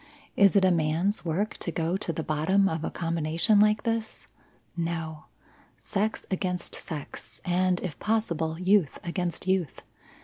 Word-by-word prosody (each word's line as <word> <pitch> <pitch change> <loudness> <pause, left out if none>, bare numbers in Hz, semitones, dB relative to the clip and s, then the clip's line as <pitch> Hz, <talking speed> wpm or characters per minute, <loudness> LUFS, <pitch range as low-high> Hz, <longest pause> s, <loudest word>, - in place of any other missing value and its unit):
Is 200 0 +5
it 195 -2 +5
a 185 - +5
man's 170 +5 +1
work 180 +6 -1
to 170 - -4
go 165 +2 -1
to 190 - -2
the 160 0 -3
bottom 160 +7 +2
of 160 -3 -2
a - - -1
combination 165 +4 +1
like 210 0 +4
this? 225 -2 -2 0.5
No. 165 -2 -3 0.5
Sex 215 +2 -2
against 180 -2 -2
sex, 150 -4 -7
and, 180 0 +2
if 165 -7 -5
possible, 170 -8 0
youth 185 -4 +3
against 175 0 -2
youth. 185 -6 0
180 Hz, 145 wpm, -27 LUFS, 160-200 Hz, 0.5 s, Is